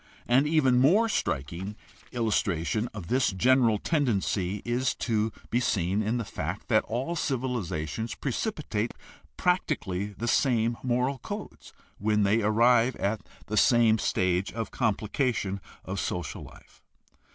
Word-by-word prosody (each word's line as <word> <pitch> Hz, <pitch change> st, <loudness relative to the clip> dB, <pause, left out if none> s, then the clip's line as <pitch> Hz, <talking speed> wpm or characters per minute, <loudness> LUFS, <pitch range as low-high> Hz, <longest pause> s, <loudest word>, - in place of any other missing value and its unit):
An 130 Hz, +4 st, +4 dB
even 135 Hz, -5 st, +3 dB
more 190 Hz, -, +5 dB
striking 85 Hz, -, -2 dB, 0.4 s
illustration 110 Hz, -2 st, 0 dB
of 105 Hz, -5 st, -7 dB
this 125 Hz, +8 st, +2 dB
general 120 Hz, +2 st, +3 dB
tendency 105 Hz, -, 0 dB
is 125 Hz, +2 st, 0 dB
to 110 Hz, -2 st, 0 dB, 0.2 s
be 120 Hz, -, +2 dB
seen 100 Hz, -4 st, 0 dB
in 110 Hz, +3 st, 0 dB
the 115 Hz, -, -3 dB
fact 90 Hz, +2 st, -5 dB
that 110 Hz, -2 st, +4 dB
all 130 Hz, +9 st, -2 dB
civilizations 115 Hz, -, -2 dB
pre 135 Hz, -, -3 dB
cipitate 120 Hz, -, -2 dB, 0.4 s
practically 100 Hz, -, 0 dB
the 105 Hz, +3 st, -6 dB
same 120 Hz, -2 st, +2 dB
moral 125 Hz, +2 st, 0 dB
codes -, -, -8 dB, 0.3 s
when 105 Hz, 0 st, +2 dB
they 105 Hz, +3 st, +3 dB
arrive 115 Hz, +3 st, +4 dB
at 100 Hz, +2 st, -1 dB, 0.2 s
the 105 Hz, -, -3 dB
same 115 Hz, -2 st, +5 dB
stage 90 Hz, 0 st, 0 dB
of 115 Hz, -1 st, -4 dB
complication 110 Hz, -2 st, -1 dB, 0.2 s
of 95 Hz, +1 st, -3 dB
social 90 Hz, -4 st, -3 dB
life. -, -, -15 dB
115 Hz, 130 wpm, -28 LUFS, 100-125 Hz, 0.4 s, more